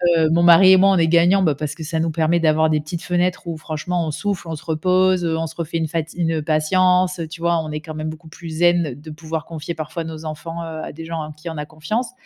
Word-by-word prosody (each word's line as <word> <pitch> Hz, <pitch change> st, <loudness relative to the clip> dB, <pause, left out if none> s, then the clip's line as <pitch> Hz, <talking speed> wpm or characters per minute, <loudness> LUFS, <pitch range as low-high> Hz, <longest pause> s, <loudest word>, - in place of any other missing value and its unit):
Heu, 160 Hz, -1 st, +3 dB
mon 170 Hz, +2 st, +3 dB
mari 175 Hz, +2 st, +8 dB
et 190 Hz, -, +8 dB
moi, 195 Hz, +1 st, +5 dB
on 190 Hz, -, +3 dB
est 165 Hz, -1 st, +3 dB
gagnants, 170 Hz, +4 st, +4 dB
bah, 155 Hz, -5 st, +2 dB
parce 145 Hz, 0 st, -4 dB
que 160 Hz, -, -8 dB
ça 160 Hz, +1 st, -2 dB
nous 165 Hz, 0 st, 0 dB
permet 165 Hz, +2 st, +1 dB
d'avoir 160 Hz, -1 st, +3 dB
des 155 Hz, -1 st, +2 dB
petites 155 Hz, +3 st, -6 dB
fenêtres 180 Hz, 0 st, -1 dB
où 165 Hz, -2 st, -4 dB
franchement 165 Hz, +3 st, -3 dB
on -, -, -2 dB
souffle, 195 Hz, +2 st, -3 dB
on 165 Hz, -, -4 dB
se 155 Hz, -, -11 dB
repose, 185 Hz, +3 st, +2 dB
heu, 160 Hz, -1 st, 0 dB
on 165 Hz, -, -2 dB
se 160 Hz, -, -11 dB
refait 165 Hz, 0 st, -3 dB
une 160 Hz, -1 st, -1 dB
fati 160 Hz, +1 st, -4 dB
une 165 Hz, -2 st, 0 dB
patience. 180 Hz, +4 st, +2 dB
Tu 165 Hz, -, -9 dB
vois, 170 Hz, 0 st, +2 dB
on 155 Hz, -, -6 dB
est 150 Hz, 0 st, -4 dB
quand 155 Hz, -1 st, -8 dB
même 155 Hz, 0 st, -3 dB
beaucoup 160 Hz, +1 st, -10 dB
plus 165 Hz, +1 st, -10 dB
zen 170 Hz, -2 st, +2 dB
de 150 Hz, +3 st, -12 dB
pouvoir 160 Hz, 0 st, -5 dB
confier 165 Hz, 0 st, -6 dB
parfois 160 Hz, +1 st, -5 dB
nos 160 Hz, -1 st, -7 dB
enfants, 160 Hz, +2 st, -6 dB
heu, 160 Hz, -1 st, -6 dB
à -, -, -6 dB
des 165 Hz, +2 st, -9 dB
gens 165 Hz, 0 st, -5 dB
en 155 Hz, 0 st, -6 dB
qui 155 Hz, +3 st, -8 dB
on 160 Hz, -, -6 dB
a 150 Hz, -, -4 dB
confiance. 165 Hz, +11 st, -3 dB
165 Hz, 280 wpm, -20 LUFS, 155-175 Hz, -, mari